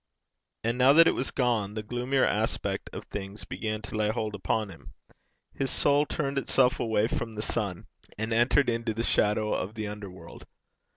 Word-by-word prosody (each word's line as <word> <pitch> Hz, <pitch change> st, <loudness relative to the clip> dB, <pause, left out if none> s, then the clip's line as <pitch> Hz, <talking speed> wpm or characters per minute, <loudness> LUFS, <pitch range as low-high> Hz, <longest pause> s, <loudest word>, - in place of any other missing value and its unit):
And 115 Hz, +2 st, -1 dB
now 130 Hz, +2 st, +7 dB
that 165 Hz, +2 st, +8 dB
it -, -, +4 dB
was 130 Hz, -, -2 dB
gone, 115 Hz, -6 st, 0 dB
the 110 Hz, -, -3 dB
gloomier 125 Hz, +4 st, +1 dB
aspect -, -, -1 dB
of -, -, -7 dB
things 100 Hz, +1 st, -6 dB
began 110 Hz, -1 st, -4 dB
to 100 Hz, -, -7 dB
lay 105 Hz, -1 st, +1 dB
hold 110 Hz, -1 st, -2 dB
upon 105 Hz, +1 st, -1 dB
him; 85 Hz, -, -14 dB, 0.6 s
his 135 Hz, -, -1 dB
soul 145 Hz, +3 st, +3 dB
turned 140 Hz, -2 st, -1 dB
itself 130 Hz, -1 st, +2 dB
away 110 Hz, -2 st, +2 dB
from 115 Hz, -1 st, -3 dB
the 105 Hz, -, -3 dB
sun, 100 Hz, -8 st, -2 dB, 0.3 s
and 110 Hz, +2 st, -2 dB
entered 120 Hz, +4 st, +3 dB
into 115 Hz, -2 st, -1 dB
the 115 Hz, -, -1 dB
shadow 105 Hz, -1 st, +2 dB
of 105 Hz, +4 st, -3 dB
the 110 Hz, -1 st, -3 dB
under 105 Hz, -1 st, -7 dB
world. 85 Hz, -2 st, -12 dB
110 Hz, 185 wpm, -28 LUFS, 105-125 Hz, 0.6 s, that